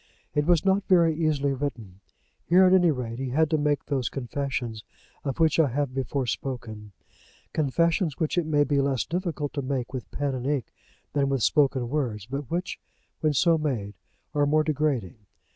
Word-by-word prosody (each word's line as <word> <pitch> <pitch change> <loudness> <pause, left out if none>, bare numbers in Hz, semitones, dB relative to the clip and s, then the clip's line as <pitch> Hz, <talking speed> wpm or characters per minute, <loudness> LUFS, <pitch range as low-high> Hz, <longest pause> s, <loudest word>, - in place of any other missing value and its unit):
It 150 +1 +1
was 175 0 +3
not 195 +1 +3
very 170 -4 +4
easily 150 -3 +1
written. 120 -9 -5 0.4
Here, 180 +2 +5
at 185 - +5
any 180 -2 +5
rate, 125 -5 -3
he 135 -1 -3
had 155 +4 +2
to 155 - +3
make 145 -1 0
those 135 -4 -1
confessions 125 -4 -4 0.4
of 135 0 -3
which 160 0 +3
I 160 - +5
have 135 +1 -2
before 135 0 -2
spoken; 110 -5 -5 0.6
confessions 160 +2 +1
which 160 - -1
it 175 -3 0
may 145 -2 +3
be 145 -1 +1
less 135 -5 0
difficult 165 -4 -3
to 145 - -2
make 130 -1 -3
with 130 -3 -5
pen 145 -1 -2
and 130 0 -3
ink 140 -6 -2 0.4
than 140 -1 +1
with 135 -4 0
spoken 135 -5 +2
words, 120 -7 -2
but 140 +2 -5
which 175 +1 -3 0.4
when 155 -1 +1
so 165 +4 +3
made 120 -10 -2 0.4
are 145 -1 +2
more 155 +1 +3
degrading. 145 - -1
140 Hz, 180 wpm, -26 LUFS, 130-155 Hz, 0.6 s, Here